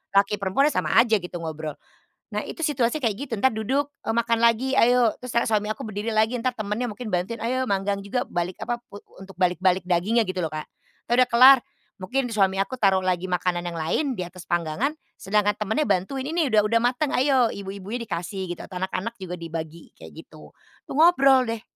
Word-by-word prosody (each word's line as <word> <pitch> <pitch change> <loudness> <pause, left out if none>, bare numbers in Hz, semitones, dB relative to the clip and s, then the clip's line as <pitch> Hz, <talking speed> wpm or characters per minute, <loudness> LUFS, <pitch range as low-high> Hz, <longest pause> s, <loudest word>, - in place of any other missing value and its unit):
laki 200 +1 +4
perempuannya 205 +10 +2
sama - - -1
aja 230 -2 +4
gitu 180 0 -7
ngobrol. 155 -2 -5 0.6
Nah, - - -2
itu - - -8
situasi 270 -1 +1
kayak 225 -6 0
gitu, 265 0 -7
entar 265 - +5
duduk, 260 +7 -1 0.2
eee, 225 - -1
makan 235 0 +1
lagi 235 +3 +2
ayo 245 -2 +4
terus 250 -1 -7
kan 235 - +2
suami 210 -1 +1
aku - - -9
berdiri 215 +2 -3
lagi 220 +3 +2
entar 250 +2 -1
temennya 215 +3 -2
mungkin 220 +2 -7
bantuin. 190 +5 -2
Ayo 255 +3 -1
manggang 200 0 0
juga 245 +5 -2
balik 175 +1 -3
apa 240 - -2
pu 205 -4 -12 0.2
untuk 195 -2 -12
balik-balik 180 0 +2
dagingnya 205 +6 +2
gitu 185 0 -2
loh, 160 - -3
Kak. 155 -1 -5 0.4
Entar 240 - +2
udah - - -20
kelar 260 +3 +9 0.4
mungkin 255 +8 -1
di 230 - -5
suami 195 -2 +2
aku 195 +6 -1
taruh 195 -2 +4
lagi 185 0 0
makanan 180 0 -1
yang 170 - -6
lain 160 - 0
di 180 - -3
atas 180 0 -11
panggangan, 175 - 0 0.3
sedangkan 205 +1 +1
temennya 220 +9 0
bantuin. 205 +8 -1
Ini 320 -2 0
udah 210 -1 +5
udah 230 +2 +2
mateng 255 +4 0
ayo 260 -3 +3
ibu-ibunya 200 +4 -6
dikasih 185 +1 -4
gitu 175 - -5
atau 180 -1 -7
anak-anak 195 +4 -3
juga 180 -1 -5
dibagi 165 -1 -7
kayak 80 0 -11
gitu. 75 -1 -15 0.3
Itu - - -18
ngobrol 275 -6 +5
deh, 220 - -9
210 Hz, 205 wpm, -24 LUFS, 185-245 Hz, 0.6 s, kelar